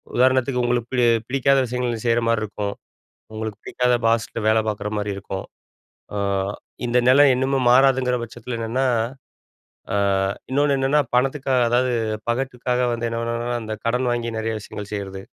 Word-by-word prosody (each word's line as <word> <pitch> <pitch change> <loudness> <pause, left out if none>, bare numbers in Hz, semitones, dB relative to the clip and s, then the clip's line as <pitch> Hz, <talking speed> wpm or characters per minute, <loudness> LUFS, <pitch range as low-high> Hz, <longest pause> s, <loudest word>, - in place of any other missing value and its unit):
உதாரணத்துக்கு 130 0 +3
உங்களுக்கு 120 -1 0
பி - - -1 0.3
பிடிக்காத 135 +1 +3
விஷயங்கள் 120 -1 -3
செய்ற 115 0 +3
மாரி 115 -1 +2
இருக்கும். 100 -1 -4 0.6
உங்களுக்கு 110 -1 -5
பிடிக்காத 125 0 +1
பாஸ்ட்ட 115 0 0
வேல 110 +1 +4
பார்க்குற 105 -1 -2
மாரி 105 -1 -2
இருக்கும். 95 -1 -5 0.7
அ - - -3 0.7
இந்த 120 +1 +2
நிலை 140 +3 +7
இன்னுமே 130 +2 0
மாறாதுங்கிற 130 0 +4
பட்சத்தில 120 +1 -6
என்னன்னா, 120 +4 0 1.1
அ - - +2 0.5
இன்னொன்னு 140 +1 +2
என்னென்னா, 135 +3 +3 0.2
பணத்துக்கா 135 +1 +1
அதாவது 125 +1 +2 0.4
பகட்டுக்காக 125 0 -1
வந்து 115 0 -2
என்னன்னா, 115 +1 -2
அந்த 110 0 -4
கடன் 125 +2 +1
வாங்கி 115 -1 -3
நிறைய 110 0 -2
விஷயங்கள் 105 0 -8
செய்றது. 95 -1 -5
120 Hz, 140 wpm, -22 LUFS, 110-130 Hz, 1.1 s, நிலை